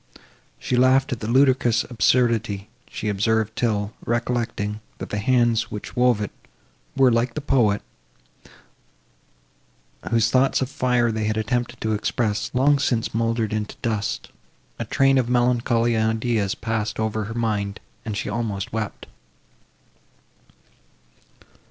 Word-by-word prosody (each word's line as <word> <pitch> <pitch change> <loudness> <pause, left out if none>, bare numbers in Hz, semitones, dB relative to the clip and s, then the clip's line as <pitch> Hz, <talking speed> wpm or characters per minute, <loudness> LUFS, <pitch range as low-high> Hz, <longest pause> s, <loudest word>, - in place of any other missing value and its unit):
She 125 - -2
laughed 130 +2 +4
at 125 - -2
the 110 - -4
ludicrous 130 -2 +3
absurdity 115 -4 +1 0.2
she 110 - -5
observed, 110 +2 0
till, 105 -3 -1
recollecting, 115 -3 -2 0.2
that - - -7
the 105 - -1
hands, 120 0 +2
which 105 - -6
had - - -17
wove 125 -3 +3
it, 105 - -3 0.7
were, 130 -2 +5
like 115 +1 0
the - - -1
poet, 120 -8 +2 2.3
whose 115 -1 +2
thoughts 130 +1 +3
of 130 0 -2
fire 125 -3 +1
they 110 -1 -2
had 110 0 0
attempted 120 +2 -2
to 110 0 0
express, 105 0 -1
long 140 +3 +4
since 120 -4 0
mouldered 115 -1 0
into 105 -1 -3
dust, 110 -3 -2 0.5
a - - -2
train 135 0 +3
of 120 -2 -1
melancholy 120 -1 +2
ideas 110 -2 0
passed 110 -2 -3
over 110 -1 -1
her 115 +2 -6
mind, 105 -3 -1 0.2
and 105 -2 -4
she - - -3
almost 105 -3 -3
wept. 110 -2 -4
115 Hz, 135 wpm, -23 LUFS, 110-125 Hz, 2.3 s, were